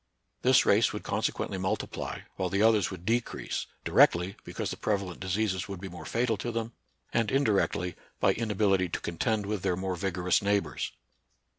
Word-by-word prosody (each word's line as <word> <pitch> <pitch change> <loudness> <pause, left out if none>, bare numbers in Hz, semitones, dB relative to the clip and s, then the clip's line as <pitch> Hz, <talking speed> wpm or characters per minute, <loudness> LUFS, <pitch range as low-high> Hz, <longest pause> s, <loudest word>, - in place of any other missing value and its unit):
This - - +5
race - - +4
would - - -5
consequently 95 - -1
multiply, 95 +3 -3
while 95 -1 -1
the 100 +3 +2
others 110 -4 +4
would 90 -2 -8
decrease, 115 +2 -1 0.2
directly, 90 +3 +4
because - - -4
the - - -3
prevalent 100 -4 -1
diseases 95 0 -1
would 100 -2 -5
be 95 +1 -6
more 90 0 -9
fatal 115 -2 +1
to 120 +5 -3
them, 115 0 -3 0.4
and 115 -3 +2
indirectly, 105 -8 +1 0.2
by - - +4
inability 100 -4 +1
to - - -2
contend 105 +5 -1
with 105 -1 -2
their 95 -1 +1
more 95 0 -2
vigorous 90 -1 +1
neighbors. 100 0 0
100 Hz, 165 wpm, -29 LUFS, 95-110 Hz, 0.4 s, This